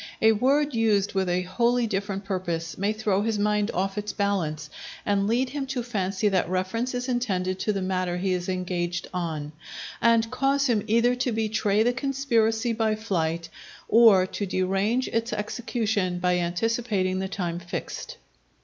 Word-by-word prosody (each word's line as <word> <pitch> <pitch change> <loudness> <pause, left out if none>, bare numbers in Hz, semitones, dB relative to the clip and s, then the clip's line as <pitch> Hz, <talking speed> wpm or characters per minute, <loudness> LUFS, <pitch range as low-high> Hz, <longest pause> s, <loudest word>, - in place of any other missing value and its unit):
A 220 - +6
word 275 +6 +2
used 210 -3 +2
with 190 -2 0
a 180 +1 +1
wholly 240 +6 +1
different 195 -1 -3
purpose, 175 -4 -3
may 200 +2 0
throw 215 -2 0
his 220 0 0
mind 210 0 +1
off 195 +3 -1
its 210 0 -4
balance 170 -7 -1 0.4
and 200 -1 +1
lead 250 +4 +1
him 275 0 -4
to 255 -2 -2
fancy 200 -3 -1
that 190 -3 +1
reference 205 +8 -1
is 245 +1 -3
intended 190 -7 -1
to 215 - 0
the 195 -2 -2
matter 185 -1 -1
he 185 +1 0
is 180 0 -2
engaged 180 -1 -2
on, 160 -4 -3 0.5
and 230 0 +3
cause 275 +2 +1
him 230 -6 +2
either 235 +3 +3
to 250 0 0
betray 215 -1 +1
the 245 +2 +2
conspiracy 240 -4 +1
by 220 -1 +1
flight, 170 -6 -2 0.4
or 220 -5 +6
to 200 +2 -4
derange 195 +7 0
its 230 +1 -1
execution 210 -4 -1
by 180 0 +1
anticipating 185 +1 0
the 190 - -2
time 175 -3 -3
fixed. 175 0 -6
205 Hz, 165 wpm, -26 LUFS, 185-230 Hz, 0.5 s, A